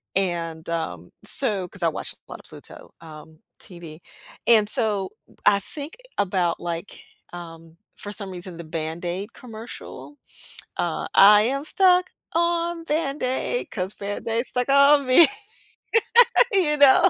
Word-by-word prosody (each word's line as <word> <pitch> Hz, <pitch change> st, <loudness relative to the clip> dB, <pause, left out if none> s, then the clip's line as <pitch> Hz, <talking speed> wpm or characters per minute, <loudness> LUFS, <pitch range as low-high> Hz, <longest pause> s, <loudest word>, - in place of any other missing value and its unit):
And, 170 Hz, -4 st, -2 dB
um, 90 Hz, -, -5 dB
so 205 Hz, -9 st, +2 dB
'cause -, -, -8 dB
I -, -, +4 dB
watch -, -, -5 dB
a -, -, -27 dB
lot -, -, -8 dB
of -, -, -18 dB
Pluto, -, -, -12 dB
um, 155 Hz, 0 st, -13 dB, 0.2 s
TV. 170 Hz, -3 st, -12 dB, 0.5 s
And 220 Hz, -3 st, +5 dB
so 210 Hz, -6 st, +1 dB, 0.4 s
I 200 Hz, -1 st, +5 dB
think 295 Hz, -, -8 dB, 0.2 s
about, 180 Hz, -4 st, 0 dB
like, 170 Hz, +2 st, -6 dB, 0.3 s
um, 165 Hz, -1 st, -11 dB, 0.2 s
for 205 Hz, -, -8 dB
some 200 Hz, -2 st, -6 dB
reason, 180 Hz, -1 st, -7 dB
the 170 Hz, -, -8 dB
Band-Aid 175 Hz, +5 st, -5 dB
commercial. 235 Hz, +5 st, -11 dB, 0.6 s
Uh, -, -, -2 dB
I 205 Hz, +1 st, +8 dB
am 275 Hz, +5 st, -1 dB
stuck 365 Hz, +1 st, +3 dB, 0.2 s
on 340 Hz, 0 st, 0 dB
Band 300 Hz, -2 st, -2 dB
Aid 260 Hz, -, -2 dB
'cause 185 Hz, 0 st, -4 dB
Band-Aid 225 Hz, +4 st, -4 dB
stuck 250 Hz, +1 st, -3 dB
on 280 Hz, 0 st, +5 dB
me. 260 Hz, +7 st, +7 dB, 1.3 s
You 335 Hz, -7 st, +2 dB
know? 285 Hz, +6 st, +6 dB
205 Hz, 135 wpm, -23 LUFS, 175-280 Hz, 1.3 s, I